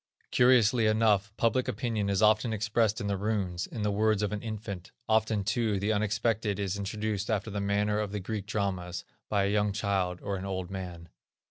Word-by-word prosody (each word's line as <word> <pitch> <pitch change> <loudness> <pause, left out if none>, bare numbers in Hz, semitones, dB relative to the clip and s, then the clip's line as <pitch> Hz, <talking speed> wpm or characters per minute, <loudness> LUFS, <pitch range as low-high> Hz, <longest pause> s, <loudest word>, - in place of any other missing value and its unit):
Curiously 120 -2 +5
enough 110 -2 +3
public 115 +2 +2
opinion 110 -2 -1
is 100 +1 +1
often 110 +2 +4
expressed 110 0 +1
in - - -4
the 100 -1 0
runes, 95 -4 -1
in 110 - -5
the 105 - +1
words 105 0 +2
of 105 - 0
an 105 -1 -3
infant; 105 -4 -6 0.2
often 110 -2 +2
too 110 -1 0
the 105 +3 +1
unexpected 105 0 0
is 100 -1 -1
introduced 105 +1 -3
after 110 -1 -1
the 100 0 -2
manner 105 +1 +1
of 105 -2 -2
the 105 - -3
Greek 100 +1 -4
dramas, 95 -5 -2 0.2
by 100 -2 +2
a 100 - +1
young 105 -1 +2
child, 95 -3 0
or 100 -1 -2
an 95 - -6
old 95 -1 -4
man. 90 -3 -6
105 Hz, 195 wpm, -29 LUFS, 100-110 Hz, 0.2 s, Curiously